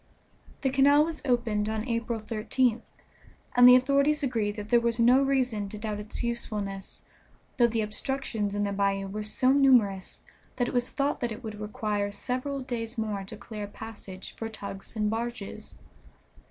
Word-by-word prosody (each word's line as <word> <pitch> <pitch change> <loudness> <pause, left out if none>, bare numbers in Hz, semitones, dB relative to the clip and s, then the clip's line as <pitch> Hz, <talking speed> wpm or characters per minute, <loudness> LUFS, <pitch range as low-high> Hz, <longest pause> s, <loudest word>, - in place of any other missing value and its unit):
The 265 - +1
canal 285 +2 +5
was 325 -1 -5
opened 225 -4 +1
on 220 +2 -3
April 230 -1 -1
13th, 225 +2 0 0.7
and 245 0 +9
the 250 - +10
authorities 280 +3 +3
agreed 225 -6 0
that 210 -1 -7
there 240 - +5
was 235 0 0
no 245 +3 +6
reason 255 -7 0
to 215 - -7
doubt 210 -1 -4
its 210 +3 -5
usefulness, 210 -5 -4 0.5
though 240 -2 +5
the 230 -1 -1
obstructions 210 -1 -2
in 205 - 0
the 200 - -1
bayou 195 0 0
were 205 +2 -5
so 215 +5 +2
numerous 245 -9 +3 0.3
that 245 - 0
it - - -4
was 245 0 +1
thought 280 +1 -1
that 240 -2 -2
it 220 +4 -7
would 215 -2 -6
require 210 -1 -2
several 255 +6 -3
days 235 -2 -4
more 210 -3 -2
to 215 +3 -9
clear 215 -2 -6
a - - -9
passage 200 -3 -9
for 225 - -4
tugs 200 -1 -8
and 210 -1 0
barges. 225 -2 -5
225 Hz, 175 wpm, -28 LUFS, 210-250 Hz, 0.7 s, the